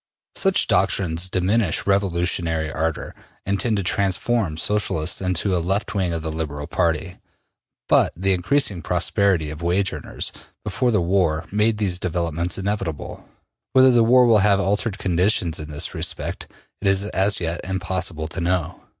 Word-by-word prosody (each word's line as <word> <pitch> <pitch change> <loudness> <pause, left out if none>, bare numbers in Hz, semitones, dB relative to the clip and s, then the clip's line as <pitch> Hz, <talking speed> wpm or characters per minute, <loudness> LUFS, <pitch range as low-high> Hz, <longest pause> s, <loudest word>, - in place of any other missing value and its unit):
Such 195 -1 +3
doctrines 90 -2 +1
diminish 95 +1 0
revolutionary 85 -5 0
ardor 80 0 -3 0.3
and 100 +1 -1
tend 115 -3 +1
to 100 - -1
transform 95 -1 0
Socialists 100 -4 0
into 90 +1 0
a 85 - 0
left 95 +5 -1
wing 95 -4 0
of 80 -1 -3
the 80 - -3
Liberal 75 -2 -4
Party. 85 +2 -1 0.7
But - - +4
the 95 +2 +1
increasing 95 0 +2
prosperity 90 -2 +1
of 80 +1 -9
wage 90 +3 0
earners 75 - -4 0.3
before 125 - 0
the 105 -5 +2
war 85 -3 +1
made 105 +2 +1
these 95 -4 -1
developments 85 -1 -2
inevitable. 95 -5 -4 0.4
Whether 130 0 +6
the 120 -1 +4
war 125 +2 +5
will 115 -3 +5
have 100 0 +3
altered 100 +1 -1
conditions 90 -3 +1
in 75 0 -7
this 75 -1 -3
respect, - - -4 0.3
it 100 - -1
is 95 +1 +2
as 100 0 +1
yet 85 0 -2
impossible 95 -3 -2
to 85 - -5
know. 85 -2 -1
90 Hz, 155 wpm, -22 LUFS, 85-100 Hz, 0.7 s, Whether